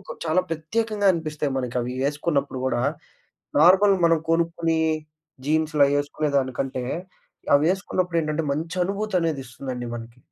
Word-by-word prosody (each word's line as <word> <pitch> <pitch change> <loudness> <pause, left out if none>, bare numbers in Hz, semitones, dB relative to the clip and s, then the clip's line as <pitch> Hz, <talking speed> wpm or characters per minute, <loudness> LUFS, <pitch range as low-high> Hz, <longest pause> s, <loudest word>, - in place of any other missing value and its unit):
ఒక 190 - -9
చాలా 160 +3 +3
ప్రత్యేకంగా 205 +6 -1
అనిపిస్తాయి 150 -3 -3
మనకవి 125 -1 -2 0.2
ఏసుకున్నప్పుడు 145 -3 -1
గూడా. 120 -2 0 0.8
నార్మల్ 195 +4 +6
మనం 165 -1 +4
కొనుక్కునీ 165 -1 +1 0.7
జీన్సులయ్యేసుకునేదానికంటే, 145 -4 +1 0.7
అవేసుకున్నప్పుడేంటంటే, 170 -1 0
మంచనుభూతనేదిస్తుందండి 165 - -2
మనకి. 115 +1 -10
155 Hz, 80 wpm, -24 LUFS, 135-170 Hz, 0.8 s, నార్మల్